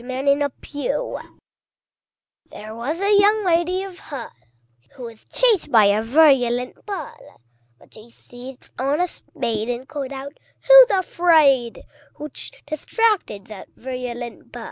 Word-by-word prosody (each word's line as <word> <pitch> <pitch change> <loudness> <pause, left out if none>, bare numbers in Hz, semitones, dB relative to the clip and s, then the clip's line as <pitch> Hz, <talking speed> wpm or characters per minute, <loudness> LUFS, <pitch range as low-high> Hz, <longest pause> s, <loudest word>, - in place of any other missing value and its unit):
There 280 +3 0 2.2
was 260 +9 -4
a 400 +1 +3
Young 415 +1 +3
Lady 355 +2 +1
of 380 -2 -10
Hull, 270 -6 -8 0.6
Who 255 - -10
was 230 -2 -11
chased 445 -11 +1
by 220 -4 +6
a 200 +2 +3
virulent 250 - +2
Bull; 400 -2 -8 0.4
But - - -23
she 220 +2 -15
seized 245 +2 -13
on 275 +4 0
a 360 - +1
spade, 230 -8 -5
and 245 +2 -4
called 285 -3 -6
out, 275 +2 -8 0.3
"Who's - - +10
afraid?" 315 - +2 0.3
Which 300 -1 -8
distracted 345 - -1
that 210 -3 -11
virulent 245 -2 -7
Bull. 240 - -9
275 Hz, 120 wpm, -21 LUFS, 240-350 Hz, 2.2 s, Who's